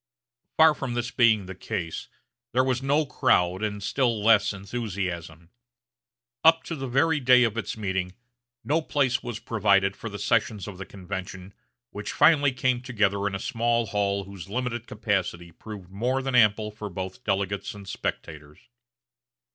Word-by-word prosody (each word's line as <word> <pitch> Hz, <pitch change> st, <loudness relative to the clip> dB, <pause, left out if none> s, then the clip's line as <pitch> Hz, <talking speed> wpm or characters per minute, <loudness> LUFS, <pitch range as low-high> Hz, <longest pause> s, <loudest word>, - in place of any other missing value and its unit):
Far 160 Hz, -1 st, +7 dB
from 130 Hz, -4 st, -4 dB
this 120 Hz, +1 st, -2 dB
being 110 Hz, -7 st, +3 dB
the 95 Hz, -, -7 dB
case, 85 Hz, -2 st, -5 dB, 0.5 s
there 130 Hz, +2 st, +4 dB
was 130 Hz, -1 st, 0 dB
no 145 Hz, +3 st, +2 dB
crowd 95 Hz, -9 st, +2 dB
and 105 Hz, -2 st, -3 dB
still 115 Hz, -1 st, 0 dB
less 110 Hz, -2 st, +5 dB
enthusiasm. 95 Hz, -6 st, -5 dB, 0.9 s
Up 165 Hz, 0 st, +6 dB
to 165 Hz, -, -5 dB
the 135 Hz, -3 st, -5 dB
very 150 Hz, +5 st, +2 dB
day 125 Hz, -1 st, +6 dB
of 115 Hz, -2 st, 0 dB
its 115 Hz, -1 st, -4 dB
meeting 95 Hz, -3 st, -2 dB, 0.5 s
no 155 Hz, +3 st, +1 dB
place 135 Hz, -5 st, 0 dB
was 120 Hz, -2 st, -5 dB
provided 100 Hz, -4 st, +2 dB
for 115 Hz, -, -7 dB
the 100 Hz, -, -6 dB
sessions 105 Hz, -3 st, 0 dB
of 95 Hz, -3 st, -8 dB
the 95 Hz, -, -7 dB
convention, 95 Hz, 0 st, -7 dB, 0.4 s
which 105 Hz, -, -5 dB
finally 145 Hz, -4 st, +5 dB
came 130 Hz, -1 st, 0 dB
together 105 Hz, -5 st, 0 dB
in 95 Hz, -, -3 dB
a -, -, -3 dB
small 120 Hz, 0 st, 0 dB
hall 100 Hz, -1 st, -1 dB
whose 95 Hz, -1 st, -10 dB
limited 120 Hz, 0 st, -3 dB
capacity 95 Hz, -5 st, -2 dB
proved 95 Hz, +1 st, -10 dB
more 125 Hz, +7 st, -1 dB
than 135 Hz, -1 st, -2 dB
ample 105 Hz, -3 st, +4 dB
for 105 Hz, 0 st, -7 dB
both 95 Hz, 0 st, -6 dB
delegates 100 Hz, 0 st, -2 dB
and 100 Hz, -1 st, -11 dB
spectators. 75 Hz, -4 st, -5 dB
105 Hz, 160 wpm, -26 LUFS, 95-125 Hz, 0.9 s, Far